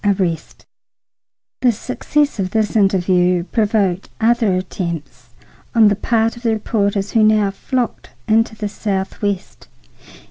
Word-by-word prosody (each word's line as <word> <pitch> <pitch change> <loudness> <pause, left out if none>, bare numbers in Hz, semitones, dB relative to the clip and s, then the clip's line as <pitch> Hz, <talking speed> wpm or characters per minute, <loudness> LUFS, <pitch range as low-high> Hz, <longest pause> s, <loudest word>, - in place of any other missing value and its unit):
ARREST 185 -5 -1 1.0
The 250 - +4
success 270 +4 -1
of 185 -1 -1
this 215 +2 0
interview 180 -3 +2
provoked 205 -3 0
other 225 -3 +2
attempts 165 -9 -5 0.5
on 220 -2 +6
the 205 - +1
part 225 +2 0
of 235 - -12
the 230 -2 +1
reporters 205 -2 -1
who 225 - +3
now 215 -2 +4
flocked 250 +4 -3 0.2
into 220 0 +2
the 215 -1 -3
Southwest. 200 -1 -3
205 Hz, 120 wpm, -18 LUFS, 185-225 Hz, 1.0 s, on